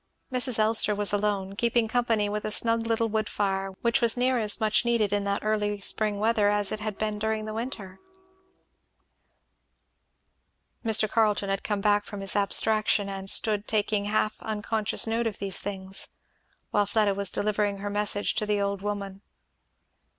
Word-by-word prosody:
Mrs. 250 -1 +2
Elster 215 -1 +3
was 205 0 +1
alone, 200 -2 -1
keeping 235 +1 +1
company 225 -2 +1
with 210 +1 -3
a - - -2
snug 230 +1 +2
little 230 0 +1
wood 215 -1 -2
fire, 195 -1 -1
which 235 -1 +2
was 235 0 +3
near 250 0 +2
as 210 -2 0
much 215 +1 +2
needed 230 -4 +1
in 205 0 0
that 200 0 -1
early 210 -1 0
spring 210 +1 -1
weather 215 -1 +2
as 205 -1 0
it 215 - -3
had 215 -1 -4
been 215 -1 -2
during 220 0 -2
the 215 - -5
winter. 215 -5 -6 2.8
Mr. 220 -1 +4
Carleton 210 -2 +1
had 195 - -2
come 205 -2 -2
back 205 0 +3
from 205 -1 -8
his 195 0 -3
abstraction, 210 0 +2
and 195 0 -5
stood 210 -1 +3
taking 210 -1 0
half 215 +1 -1
unconscious 215 0 -1
note 230 +1 -1
of 215 - -4
these 195 -2 -1
things, 195 -1 -4 0.6
while 205 -1 +2
Fleda 210 -1 +2
was 200 -1 0
delivering 205 -1 -1
her 205 +1 -5
message 205 0 -1
to 210 - -1
the 210 -1 +1
old 200 -1 -2
woman. 200 -1 -5
210 Hz, 170 wpm, -26 LUFS, 200-220 Hz, 2.8 s, Mr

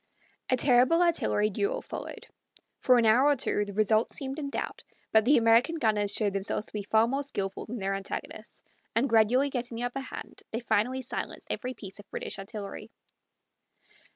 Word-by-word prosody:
A 255 - +3
terrible 255 +7 +4
artillery 215 -11 +1
duel 465 - -1
followed. - - -7 0.5
For 250 -1 +5
an 235 - +3
hour 240 +6 +5
or 290 - +4
two 210 -4 0
the 200 - -8
result 215 +1 +3
seemed 275 0 -4
in 285 -2 -3
doubt; - - -5 0.3
but 220 -1 +4
the 285 +4 +5
American 230 +7 +4
gunners 210 -8 +1
showed 205 -1 +1
themselves 195 +2 -2
to - - -13
be 210 - -2
far 220 +3 +3
more 270 +3 -1
skilful 195 -9 -4
than 240 - -5
their 195 -2 -2
antagonists, 195 0 -6 0.3
and 235 +4 +3
gradually 240 +4 +3
getting 240 -2 -4
the 240 - -3
upper 245 +2 -2
hand, 265 - -9
they 225 - -3
finally 250 +3 0
silenced 255 - -5
every 255 -1 -4
piece 195 -1 -10
of 205 - -14
British - - -4
artillery. 200 0 -7
230 Hz, 180 wpm, -28 LUFS, 210-265 Hz, 0.5 s, For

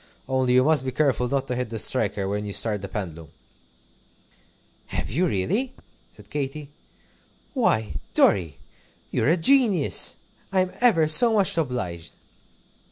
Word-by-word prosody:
Only 130 -1 0
you 130 - +5
must 150 -2 +2
be 130 - -3
careful 130 -2 0
not 135 0 -2
to 125 - -3
hit 125 -1 -3
the 115 - -5
striker 105 -4 0
when 105 +1 -3
you 100 -1 -6
start 105 -2 0
the 100 - -6
pendulum." 85 -6 -7 1.6
"Have - - -3
you, 175 +10 +1
really?" 205 - -2 0.4
said - - -18
Katy. 145 0 -5 0.8
"Why, 110 - 0 0.2
Dorry, 85 -8 +2 0.5
you're - - 0
a 170 - +3
genius! 205 - +3 0.4
I'm 185 -1 0
ever 195 -11 +3
so 225 +10 +6
much 200 -4 +2
obliged." 120 - -4
130 Hz, 140 wpm, -23 LUFS, 105-165 Hz, 1.6 s, so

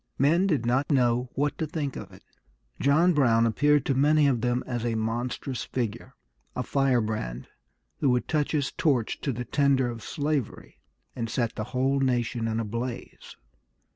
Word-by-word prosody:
Men 165 +8 +3
did 145 -10 0
not 130 +4 +1
know 125 -2 +2
what 145 +1 -1
to 160 - -1
think 145 -3 -3
of - - -8
it. - - -16 0.6
John 160 +6 +4
Brown 115 -6 +3
appeared 145 +5 +2
to 135 - +1
many 150 +3 +4
of 130 -5 +2
them 125 +1 0
as 120 -3 -3
a 120 -1 -1
monstrous 120 +4 -3
figure, 120 +1 -4 0.4
a 125 - -2
firebrand 110 - -1 0.5
who 140 - +2
would 125 -1 +1
touch 150 -2 0
his 145 -3 0
torch 130 -8 0
to 140 - -1
the 125 0 -5
tinder 135 -2 +2
of 115 -1 -8
slavery, 145 -1 -3 0.4
and 115 -2 -3
set 115 0 -1
the 110 - -4
whole 130 +3 0
nation 120 -3 0
in 110 0 -1
a 115 - -2
blaze. 115 +3 -6
125 Hz, 170 wpm, -27 LUFS, 115-140 Hz, 0.6 s, John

